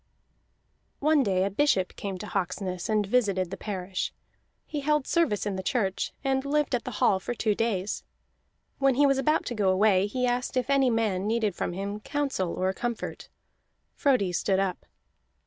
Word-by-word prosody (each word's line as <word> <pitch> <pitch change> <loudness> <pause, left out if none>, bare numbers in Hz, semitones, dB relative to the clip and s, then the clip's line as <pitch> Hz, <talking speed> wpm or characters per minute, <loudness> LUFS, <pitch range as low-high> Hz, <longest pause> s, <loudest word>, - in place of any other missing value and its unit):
One 305 0 +3
day 190 -6 +2
a 195 - 0
bishop 195 -5 +1
came 195 -2 -4
to 185 - -7
Hawksness 185 -1 -3
and 215 -1 +2
visited 195 -5 +1
the - - -3
parish. 190 -2 -3 0.5
He 300 - -4
held 300 -1 +1
service 330 - +1
in 200 -2 -2
the - - -2
church, 195 -1 -1
and 265 -1 +1
lived 290 0 0
at 245 - 0
the 250 - -4
hall 190 - +3
for 240 +6 -4
two 215 -2 +1
days. 205 -3 -1 0.8
When 270 -2 +3
he 285 +3 +5
was 275 -1 +3
about 305 +4 +2
to - - -3
go 205 -4 +1
away, 190 0 +4
he 250 +4 -1
asked 250 +1 -1
if 255 +2 0
any 270 -2 +4
man 210 -4 0
needed 220 -3 +1
from 175 - -3
him 200 +3 -4
counsel 265 -8 -2
or 185 +1 0
comfort. 240 +2 -4 0.6
Frodi 255 - +2
stood 190 +2 +1
up. 185 - -2
210 Hz, 180 wpm, -27 LUFS, 190-265 Hz, 0.8 s, he